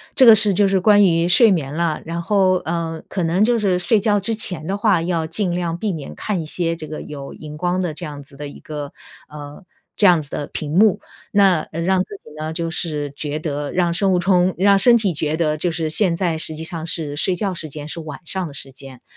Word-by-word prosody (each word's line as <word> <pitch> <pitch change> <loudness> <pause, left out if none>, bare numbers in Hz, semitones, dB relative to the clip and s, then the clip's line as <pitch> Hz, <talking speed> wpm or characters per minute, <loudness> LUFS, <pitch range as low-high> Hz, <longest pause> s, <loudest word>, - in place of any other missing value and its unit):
这 260 - +6
个 225 -2 +9
是 210 -1 +5
就 200 +2 +3
是 195 -1 +2
关 205 +2 +5
于 165 -1 +2
睡 220 +5 +5
眠 150 -6 -2
了， 165 -2 -1
然 170 +1 -4
后， 190 +1 +2
呃， 165 -1 -4
可 185 - -2
能 170 +5 +1
就 235 +1 +2
是 195 -4 +1
睡 210 +5 +2
觉 205 0 +1
之 225 +3 -1
前 180 -7 -3
的 195 +4 -2
话， 205 -5 +2
要 165 -2 -2
尽 180 +3 -1
量 170 -1 -2
避 210 +3 -2
免 155 -6 -7
看 200 -5 -3
一 - - -6
些 165 +1 +1
这 155 -2 -8
个 155 0 -7
有 140 -2 -8
荧 150 -1 -10
光 180 +3 -1
的 175 -4 -2
这 170 +3 -7
样 145 -2 -8
子 140 0 -17
的 145 +1 -6
一 140 - -12
个， 145 -2 -7 0.3
呃 150 +3 -11 0.3
这 205 - +5
样 175 -3 +5
子 145 - -11
的 145 - -5
屏 150 -1 -5
幕。 205 0 +4 0.3
那， 195 -4 +4
呃， 165 - -3
让 185 +2 +1
自 - - -10
己 - - -14
呢 155 +1 -4
就 165 0 -3
是 150 -3 -3
觉 145 +1 -5
得 145 -2 -4
让 175 -2 +1
生 190 +2 +1
物 - - +3
钟 180 0 +2
让 200 +2 +4
身 240 +4 +6
体 210 -6 +1
觉 155 0 -1
得 155 -2 0
就 170 +3 -1
是 160 -1 -3
现 175 +1 +5
在 170 -2 -1
实 160 0 -1
际 160 - -7
上 160 -1 -6
是 155 -3 -3
睡 180 +4 +3
觉 195 +1 -2
时 165 -2 -4
间， 150 0 -8
是 170 - -3
晚 155 0 -8
上 185 +1 -3
的 145 - -11
时 140 -1 -6
间。 135 -1 -12
170 Hz, 270 characters per minute, -20 LUFS, 155-190 Hz, 0.3 s, 个